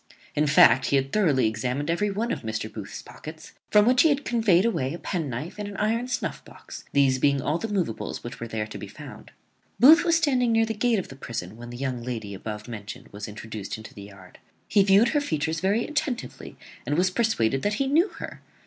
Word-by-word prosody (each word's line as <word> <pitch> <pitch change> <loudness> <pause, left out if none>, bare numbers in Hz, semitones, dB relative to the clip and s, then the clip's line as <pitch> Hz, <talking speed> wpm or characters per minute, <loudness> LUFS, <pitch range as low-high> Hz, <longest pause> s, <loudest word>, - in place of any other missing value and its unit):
In 150 +1 +1
fact, 130 -3 +6
he - - +2
had 135 0 +1
thoroughly 155 - +3
examined 125 +8 -1
every 205 +5 0
one 220 +4 -2
of - - -3
Mr. 110 -1 -4
Booth's 105 -2 -7
pockets; 155 +1 -11 0.2
from 210 0 +5
which 250 +1 +5
he 320 - +5
had 285 -1 0
conveyed 220 -6 +3
away 145 - -1
a - - -6
penknife 160 - -4
and 205 - -4
an 200 -1 -7
iron 230 +3 0
snuff 250 - -3
box, - - -12
these 135 -2 +3
being 140 +1 +3
all 150 +5 -1
the 225 - -3
moveables 180 - -3
which 120 0 -8
were 115 - -5
to 110 -1 -4
be - - -7
found. - - -11 0.5
Booth 315 +7 +8
was 335 -2 +3
standing 260 -7 +2
near 225 0 +3
the 225 - -3
gate 230 +1 +1
of 190 - -4
the 135 - -10
prison 110 -7 -6
when 120 +1 -10
the 120 - -8
young 130 -2 -3
lady 115 -4 -5
above 105 +2 -7
mentioned 105 -3 -8
was 100 0 -7
introduced 105 -1 -7
into 110 - -11
the 100 - -11
yard. 100 -2 -14 0.3
He 205 - +4
viewed 200 +4 +5
her 295 - +1
features 160 - -1
very 200 +6 +1
attentively, 295 -5 -4 0.3
and 145 - -1
was 185 +1 +2
persuaded 135 - +1
that 205 +1 0
he 275 - 0
knew 310 +8 +3
her. - - -8
155 Hz, 220 wpm, -25 LUFS, -, 0.5 s, Booth